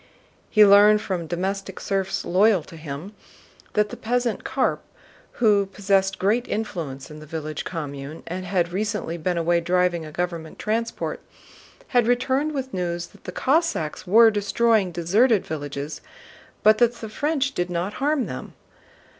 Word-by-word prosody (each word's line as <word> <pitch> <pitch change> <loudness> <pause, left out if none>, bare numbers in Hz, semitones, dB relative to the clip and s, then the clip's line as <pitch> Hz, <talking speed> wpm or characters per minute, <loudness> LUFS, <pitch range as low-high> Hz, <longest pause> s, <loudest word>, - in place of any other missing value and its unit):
He 215 -1 +7
learned 205 +1 +7
from 185 -5 -3
domestic 190 +3 -3
serfs 195 -1 -2
loyal 190 -1 +3
to 165 - -13
him 155 +5 -7 0.6
that 210 0 +2
the - - -7
peasant 240 0 -1
Karp, - - 0 0.5
who 205 -4 +3
possessed 195 0 +1
great 220 +6 +1
influence 160 -11 -4
in 150 - -9
the 155 - -12
village 155 -1 -5
commune 145 -2 -6
and 180 +2 -5
had 180 -2 0
recently 210 -4 -2
been 175 +2 -1
away 170 +1 +2
driving 180 -1 +1
a 155 - -9
government 170 -1 -4
transport, 230 +2 -2 0.7
had 245 -3 +3
returned 260 +5 +1
with 265 -1 -4
news 175 -1 -2
that - - -21
the - - -5
Cossacks 265 - 0
were 225 +4 +7
destroying 210 -1 +2
deserted 195 +7 +2
villages, 145 -1 -5 0.6
but 215 0 +6
that 240 0 +3
the 225 - -7
French 280 +4 -1
did 175 -5 -2
not 175 +3 -2
harm 290 -2 +1
them. - - -7
195 Hz, 150 wpm, -24 LUFS, 170-220 Hz, 0.7 s, He